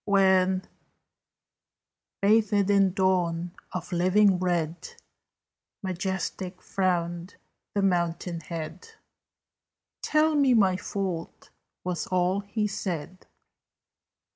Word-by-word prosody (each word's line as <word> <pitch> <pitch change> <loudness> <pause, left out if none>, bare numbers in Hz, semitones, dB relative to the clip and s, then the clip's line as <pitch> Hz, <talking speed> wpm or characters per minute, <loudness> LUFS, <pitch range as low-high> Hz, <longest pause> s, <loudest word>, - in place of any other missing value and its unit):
When, 190 -2 +3 1.6
bathed 205 -1 +3
in 195 -2 +4
Dawn 180 -3 +1 0.2
of 180 0 -5
living 185 +2 +4
red, 175 - -2 0.9
Majestic 185 0 -3
frowned 175 -1 -1 0.4
the 200 - +1
mountain 175 -2 0
head, 165 +1 -7 1.1
"Tell 310 +1 +2
me 275 -4 +4
my 190 -4 +4
fault," 185 -3 -5 0.3
was 180 -3 -3
all 185 +1 +1
he 205 +2 -2
said. 185 -3 -4
185 Hz, 85 wpm, -27 LUFS, 175-200 Hz, 1.6 s, in